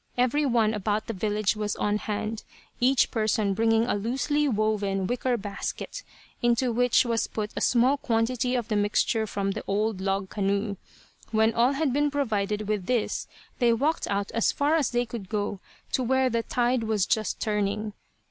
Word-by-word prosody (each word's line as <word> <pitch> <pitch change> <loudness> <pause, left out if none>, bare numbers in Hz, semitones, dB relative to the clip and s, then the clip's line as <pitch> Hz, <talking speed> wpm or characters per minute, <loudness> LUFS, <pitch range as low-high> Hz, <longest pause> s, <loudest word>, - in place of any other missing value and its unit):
Every 255 +4 +2
one 225 -3 +2
about 210 +1 -1
the 230 - -4
village 210 +1 0
was 210 -1 -2
on 210 0 0
hand, 215 +1 -3 0.4
each 255 +1 +3
person 215 -2 +1
bringing 225 +2 +3
a - - 0
loosely 270 +8 0
woven 210 -4 0
wicker 245 +3 0
basket, 205 - -5 0.4
into 240 +1 +2
which 245 +2 +3
was 230 -1 0
put 210 -1 -4
a - - -3
small 255 +4 +3
quantity 245 +1 0
of 240 -3 -1
the 215 - -1
mixture 215 +2 +1
from 200 -1 -1
the 215 +2 -5
old 210 0 0
log 195 0 -1
canoe. 200 0 -1 0.5
When 220 0 +3
all 240 +4 +3
had 280 -2 0
been 290 +1 +2
provided 215 -7 -1
with 210 -4 -2
this 240 -4 0 0.3
they 240 -2 +4
walked 290 +8 0
out 200 0 -1
as 230 - +2
far 290 +2 +1
as 310 -6 +2
they 240 0 0
could 225 -5 -7
go, 205 -2 -2 0.3
to - - +1
where 260 +1 +2
the 230 0 +1
tide 245 +1 0
was 215 -3 +1
just 215 -2 0
turning. 210 0 -1
220 Hz, 175 wpm, -26 LUFS, 205-245 Hz, 0.5 s, they